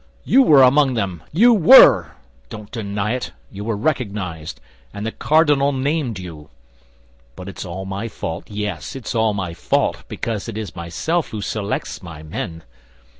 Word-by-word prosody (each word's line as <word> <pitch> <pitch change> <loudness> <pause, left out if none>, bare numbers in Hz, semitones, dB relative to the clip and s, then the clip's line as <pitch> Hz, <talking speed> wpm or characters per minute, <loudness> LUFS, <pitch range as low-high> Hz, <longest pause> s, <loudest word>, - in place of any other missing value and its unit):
You 270 - +4
were 145 - +6
among 135 0 +4
them—you 110 - +2
were! 165 - +7 0.4
Don't 105 -1 -10
deny 105 -1 -3
it; 125 - -4 0.2
you 100 0 -7
were 110 -1 -2
recognized, 100 - -3 0.4
and 100 +1 -5
the 115 - -2
cardinal 145 -2 +2
named 135 -4 -1
you. 80 -5 -10 0.9
But 90 - -9
it's 100 - -7
all 95 +2 -6
my 100 +4 -4
fault; 80 -6 -6
yes, 105 - -5
it's 135 - -5
all 110 -2 +1
my 90 -4 -4
fault, 85 - -1
because 115 -1 -4
it 110 - -6
is 105 -8 -6
myself 145 - -2
who 110 - -6
selects 100 0 -4
my 85 -4 -10
men. 80 +1 -6
105 Hz, 155 wpm, -20 LUFS, 90-130 Hz, 0.9 s, were